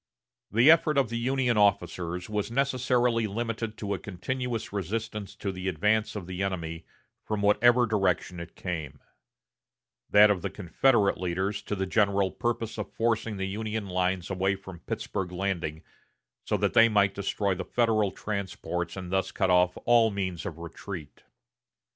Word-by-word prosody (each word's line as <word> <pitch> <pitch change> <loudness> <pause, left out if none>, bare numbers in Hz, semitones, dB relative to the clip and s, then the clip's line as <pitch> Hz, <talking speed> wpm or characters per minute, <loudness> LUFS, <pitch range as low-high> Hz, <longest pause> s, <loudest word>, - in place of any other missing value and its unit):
The 120 +8 +6
effort 155 -2 +3
of 135 -5 +3
the 115 - -2
Union 125 -1 +1
officers 90 -3 +1
was 105 0 -2
necessarily 125 -3 +1
limited 115 +1 -3
to 100 -1 -3
a 95 - -3
continuous 115 +5 -4
resistance 105 +2 -4
to 100 - -3
the 95 0 -5
advance 105 +6 +1
of 100 -4 -5
the 90 +1 -5
enemy, 85 -4 -3 0.4
from 105 -1 -2
whatever 120 +4 +5
direction 95 -4 0
it 85 0 -9
came; 75 -6 -5 1.1
that 105 0 +7
of 95 -3 -1
the - - -2
Confederate 105 +2 +2
leaders 95 +3 -1
to 105 - -4
the 95 -1 -1
general 100 -1 +2
purpose 115 -2 -2
of - - -5
forcing 115 -2 0
the 95 - -2
Union 110 +2 -3
lines 90 0 -1
away 95 +1 +1
from 95 -2 -11
Pittsburg 90 +1 -4
Landing 90 -4 -3 0.6
so - - +1
that - - 0
they 115 0 +7
might 100 -2 +3
destroy 100 0 -1
the 95 +1 -4
Federal 110 -1 +2
transports 95 -3 -4
and 90 -1 -6
thus 95 0 0
cut 95 -2 +1
off 90 0 +3
all 120 -2 +5
means 95 -3 -3
of 85 -5 -6
retreat. 85 -1 -8
100 Hz, 160 wpm, -28 LUFS, 90-115 Hz, 1.1 s, that